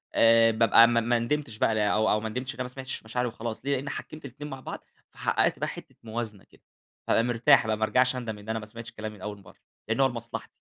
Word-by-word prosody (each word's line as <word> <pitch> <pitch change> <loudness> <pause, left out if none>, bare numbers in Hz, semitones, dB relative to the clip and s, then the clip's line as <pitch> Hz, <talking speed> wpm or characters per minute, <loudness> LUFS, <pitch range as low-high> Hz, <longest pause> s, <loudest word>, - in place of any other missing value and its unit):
آآ، 115 0 +6
بأبقى 115 +1 +6
ما 120 -1 +3
ما 120 +1 +1
ندمتش 120 -1 -2
بقى 110 -2 +2
أو 110 +1 +2
أو 105 - +3
ما 110 +1 -4
ندمتش 125 +4 -4
إن - - -15
أنا - - 0
ما 125 - -5
سمعتش 130 -1 -5
مشاعري 125 +3 -2
وخلاص 115 +1 -6
ليه؟ 140 - +1
لأني 140 +2 -4
حكّمت 155 -1 -7
الاتنين 140 +3 -8
مع 135 -1 -7
بعض، - - -7 0.3
فحققت - - +1
بقى - - -1
حتّة - - -9
موازنة 110 -3 -5
كده، - - -24 0.5
فأبقى 115 - +3
مرتاح 120 +1 +4
بقى 110 - 0
ما 110 - -2
أرجعش 125 +4 +2
أندم 115 -4 -4
إن 105 +2 -12
أنا 110 0 -1
ما 105 - -8
سمعتش 115 +2 -9
كلامي 110 0 -7
من 95 - -16
أوّل 105 -1 -5
مرّة، - - -17 0.3
لأنّه 115 +5 +2
هو - - +5
لمصلحتي. 115 -2 -6
115 Hz, 250 wpm, -27 LUFS, 110-125 Hz, 0.5 s, آآ